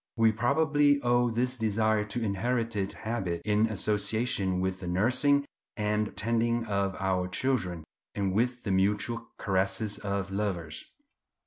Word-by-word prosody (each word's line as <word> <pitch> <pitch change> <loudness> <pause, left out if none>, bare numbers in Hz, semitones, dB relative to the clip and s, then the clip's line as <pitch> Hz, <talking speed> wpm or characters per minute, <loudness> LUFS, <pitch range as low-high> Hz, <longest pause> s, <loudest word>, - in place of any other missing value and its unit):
We 115 -1 +5
probably 145 +5 +3
owe 120 0 +3
this 125 +3 -1
desire 110 -1 +1
to 115 +3 -3
inherited 110 0 -1
habit, 95 -7 -3
in 105 +1 +3
association 105 -2 0
with 95 0 -1
the 90 - -6
nursing 130 +10 +2 0.3
and 105 -1 -1
tending 115 +2 +1
of 100 -2 -1
our 95 -1 0
children, 90 -6 -1 0.3
and 100 -2 0
with 120 +4 0
the 100 - -2
mutual 105 +5 0
caresses 95 +2 0
of 100 -1 -3
lovers. 95 -6 -3
105 Hz, 130 wpm, -29 LUFS, 95-120 Hz, 0.3 s, We